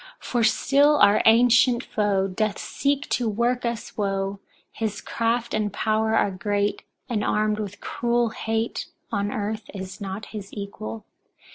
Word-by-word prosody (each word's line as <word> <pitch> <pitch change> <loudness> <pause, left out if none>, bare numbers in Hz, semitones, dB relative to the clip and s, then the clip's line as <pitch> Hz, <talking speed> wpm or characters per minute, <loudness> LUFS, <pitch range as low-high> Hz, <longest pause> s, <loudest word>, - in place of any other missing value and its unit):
For 240 -2 -1
still 280 +6 +4
our 205 -5 +5
ancient 245 +2 +5
foe 200 -2 +1
doth 205 +2 -1
seek 285 0 -1
to 240 -3 +1
work 240 +4 0
us 235 -1 -5
woe; 195 -1 -1 0.3
his 220 -2 -3
craft 235 +1 -1
and 210 -1 0
power 220 +2 +1
are 205 - +3
great, 205 +2 -1 0.3
and 225 -5 -1
armed 215 0 +1
with 205 -1 -6
cruel 240 0 0
hate, 225 0 -2 0.2
on 205 -2 -1
earth 215 +1 -3
is 190 +1 -7
not 195 +2 -5
his 200 -2 -7
equal. 115 - -6
215 Hz, 145 wpm, -24 LUFS, 200-235 Hz, 0.3 s, our